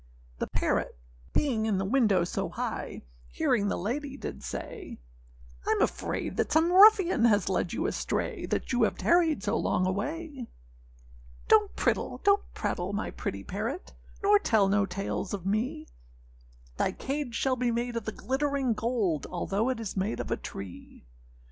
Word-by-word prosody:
The -, -, -1 dB
parrot -, -, -1 dB, 0.3 s
being 230 Hz, -7 st, +1 dB
in 205 Hz, -3 st, +1 dB
the 190 Hz, -, -1 dB
window 210 Hz, -5 st, +3 dB
so 175 Hz, -, -2 dB
high, -, -, -4 dB, 0.2 s
Hearing 200 Hz, -, +1 dB
the -, -, 0 dB
lady, 270 Hz, +8 st, -3 dB
did -, -, -6 dB
say, -, -, -6 dB, 0.7 s
âIâm -, -, +2 dB
afraid -, -, -1 dB
that -, -, 0 dB
some 320 Hz, +3 st, +4 dB
ruffian 380 Hz, -, +7 dB
has 205 Hz, -4 st, +3 dB
led 180 Hz, -2 st, 0 dB
you 320 Hz, -, -2 dB
astray, 405 Hz, -, -2 dB
That -, -, -2 dB
you 245 Hz, -, +2 dB
have 220 Hz, -, +2 dB
tarried 330 Hz, -, +3 dB
so 210 Hz, +2 st, 0 dB
long 185 Hz, -, +1 dB
away.â 270 Hz, -, -3 dB, 1.0 s
âDonât 420 Hz, -2 st, +6 dB
prittle -, -, 0 dB
nor 400 Hz, 0 st, +6 dB, 0.2 s
prattle, 180 Hz, +3 st, -2 dB
my 210 Hz, -, -2 dB
pretty 100 Hz, 0 st, -4 dB
parrot, 220 Hz, -, -4 dB, 0.3 s
Nor 410 Hz, +1 st, +6 dB
tell 220 Hz, -, +3 dB
no 200 Hz, 0 st, +2 dB
tales 195 Hz, +1 st, -3 dB
of 190 Hz, -3 st, -9 dB
me; 250 Hz, +11 st, -1 dB, 0.9 s
Thy -, -, +1 dB
cage 275 Hz, -3 st, -3 dB
shall 265 Hz, +1 st, +1 dB
be 250 Hz, -1 st, 0 dB
made 235 Hz, +1 st, -1 dB
of 230 Hz, -3 st, -3 dB
the 220 Hz, -, -2 dB
glittering 270 Hz, 0 st, 0 dB
gold, 210 Hz, -, -1 dB
Although 195 Hz, +6 st, -1 dB
it 255 Hz, -3 st, -1 dB
is 220 Hz, -4 st, -5 dB
made 195 Hz, +3 st, -1 dB
of -, -, -4 dB
a -, -, +3 dB
tree. 95 Hz, -9 st, -9 dB
230 Hz, 160 wpm, -29 LUFS, 200-290 Hz, 1.0 s, ruffian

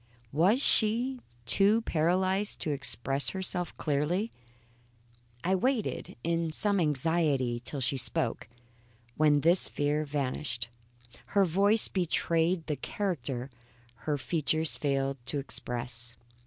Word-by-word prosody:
Was 180 Hz, -, +3 dB
she 240 Hz, +4 st, +3 dB, 0.3 s
too 205 Hz, -, +4 dB
paralysed 185 Hz, +3 st, +1 dB
to 155 Hz, -, -1 dB
express 135 Hz, 0 st, +1 dB
herself 185 Hz, -2 st, -2 dB
clearly? 155 Hz, +9 st, 0 dB, 1.1 s
I 185 Hz, -, +1 dB
waited 230 Hz, +4 st, -1 dB
in 165 Hz, -1 st, 0 dB
some 200 Hz, +4 st, +2 dB
anxiety 150 Hz, -5 st, +1 dB
till 140 Hz, +2 st, -5 dB
she 130 Hz, +2 st, 0 dB
spoke, 130 Hz, -2 st, -1 dB, 0.7 s
when 150 Hz, -1 st, +4 dB
this 170 Hz, +4 st, +4 dB
fear 145 Hz, +1 st, 0 dB
vanished. 135 Hz, -4 st, -3 dB, 0.7 s
Her 200 Hz, -, +6 dB
voice 200 Hz, +5 st, +3 dB
betrayed 170 Hz, -1 st, 0 dB
the 150 Hz, -3 st, -2 dB
character 135 Hz, -10 st, -3 dB, 0.6 s
her 145 Hz, -, +1 dB
features 160 Hz, +1 st, -1 dB
failed 135 Hz, -1 st, -1 dB
to 145 Hz, -, 0 dB
express. 120 Hz, -3 st, -4 dB
155 Hz, 110 wpm, -29 LUFS, 140-185 Hz, 1.1 s, Her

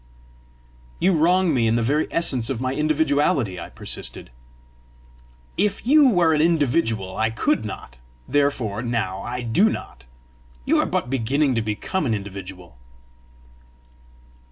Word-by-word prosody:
"You 185 Hz, +2 st, +2 dB
wrong 175 Hz, +2 st, +3 dB
me 120 Hz, -4 st, +2 dB
in 110 Hz, -, +2 dB
the 120 Hz, -, +1 dB
very 145 Hz, +6 st, +1 dB
essence 130 Hz, -8 st, +1 dB
of 130 Hz, -4 st, -2 dB
my 130 Hz, +1 st, -2 dB
individuality!" 145 Hz, -, +1 dB
I -, -, -8 dB
persisted. -, -, -5 dB, 1.3 s
"If 205 Hz, +3 st, 0 dB
you 285 Hz, +1 st, +6 dB
were 175 Hz, -7 st, +3 dB
an 150 Hz, -, +2 dB
individual 135 Hz, -, +1 dB
I 110 Hz, 0 st, +1 dB
could 110 Hz, -, 0 dB
not, -, -, -8 dB, 0.3 s
therefore 130 Hz, -7 st, 0 dB
now 110 Hz, -6 st, -2 dB
I 125 Hz, +1 st, -5 dB
do 175 Hz, -, +3 dB
not. -, -, -7 dB, 0.6 s
You -, -, +3 dB
are -, -, +1 dB
but 125 Hz, -, -2 dB
beginning 135 Hz, +3 st, +1 dB
to 115 Hz, -, 0 dB
become 110 Hz, -, -2 dB
an 115 Hz, -, +1 dB
individual." 95 Hz, -, -9 dB
130 Hz, 135 wpm, -22 LUFS, 110-160 Hz, 1.3 s, you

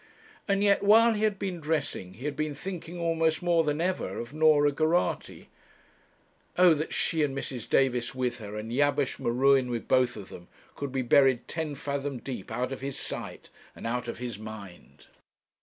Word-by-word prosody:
And 200 Hz, 0 st, +2 dB
yet 200 Hz, -1 st, +4 dB
while 225 Hz, +3 st, +6 dB
he 210 Hz, -, -3 dB
had 210 Hz, -2 st, 0 dB
been 190 Hz, -3 st, -4 dB
dressing 145 Hz, -, -3 dB
he 125 Hz, -, -9 dB
had 150 Hz, -1 st, -2 dB
been 155 Hz, 0 st, -2 dB
thinking 175 Hz, +1 st, -6 dB
almost 165 Hz, -1 st, +1 dB
more 170 Hz, -2 st, +3 dB
than 150 Hz, 0 st, -1 dB
ever 185 Hz, +2 st, -1 dB
of 120 Hz, +4 st, -6 dB
Norah 155 Hz, -2 st, +4 dB
Geraghty. 160 Hz, +4 st, -1 dB, 1.1 s
O 180 Hz, -2 st, +7 dB
that 155 Hz, +1 st, -3 dB
she, 160 Hz, -, +1 dB
and 140 Hz, -2 st, 0 dB
Mrs. 130 Hz, -4 st, -5 dB
Davis 125 Hz, -2 st, +1 dB
with 125 Hz, -1 st, -2 dB
her, 105 Hz, -1 st, -7 dB
and 110 Hz, +2 st, -6 dB
Jabesh 145 Hz, +1 st, +1 dB
M'Ruen 130 Hz, +2 st, +3 dB
with 120 Hz, -2 st, -4 dB
both 130 Hz, -1 st, +3 dB
of 100 Hz, -2 st, -9 dB
them, 90 Hz, 0 st, -11 dB, 0.3 s
could 140 Hz, -2 st, -5 dB
be 130 Hz, -1 st, -1 dB
buried 130 Hz, -1 st, +4 dB
ten 160 Hz, -3 st, -3 dB
fathom 140 Hz, 0 st, -3 dB
deep 120 Hz, -6 st, -7 dB
out 125 Hz, +1 st, -2 dB
of 135 Hz, -, -5 dB
his 135 Hz, 0 st, -4 dB
sight, -, -, -7 dB, 0.2 s
and -, -, -9 dB
out 120 Hz, +1 st, -2 dB
of 115 Hz, -, -5 dB
his 120 Hz, -4 st, -5 dB
mind! 105 Hz, -4 st, -11 dB
140 Hz, 185 wpm, -28 LUFS, 125-160 Hz, 1.1 s, O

